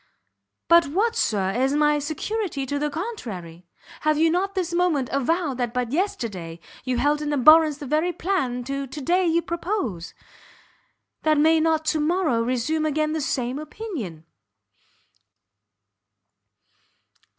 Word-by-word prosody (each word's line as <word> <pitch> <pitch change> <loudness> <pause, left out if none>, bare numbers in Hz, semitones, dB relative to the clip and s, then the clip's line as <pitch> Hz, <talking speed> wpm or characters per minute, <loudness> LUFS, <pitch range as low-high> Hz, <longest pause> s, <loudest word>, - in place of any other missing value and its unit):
"But 335 -2 +6
what, 415 +10 0
Sir, 195 -3 0
is 265 +6 +1
my 295 0 +3
security 310 +1 -3
to 285 +2 -2
the 300 +1 0
contrary? 210 - -6 0.3
Have 305 0 +1
you 325 +1 +3
not 390 +3 -1
this 360 -2 -2
moment 345 -7 +1
avowed 280 0 0
that 240 -1 -2
but 250 -2 -1
yesterday 205 - -3 0.2
you 255 -1 -1
held 295 +3 +1
in 300 -1 -2
abhorrence 305 +2 +6
the 290 - -8
very 310 +6 +1
plan 295 -10 -1
that 275 +1 -4
to 305 - -5
day 355 +5 +2
you 335 +1 +2
propose? 335 - -3 1.1
And 310 -1 +3
may 320 +1 +5
you - - +2
not 320 -1 +1
to 310 0 +1
morrow 310 -6 +1
resume 255 +7 0
again 305 +1 0
the 315 - -1
same 255 -1 -2
opinion?" 295 - -7
300 Hz, 140 wpm, -24 LUFS, 250-335 Hz, 1.1 s, But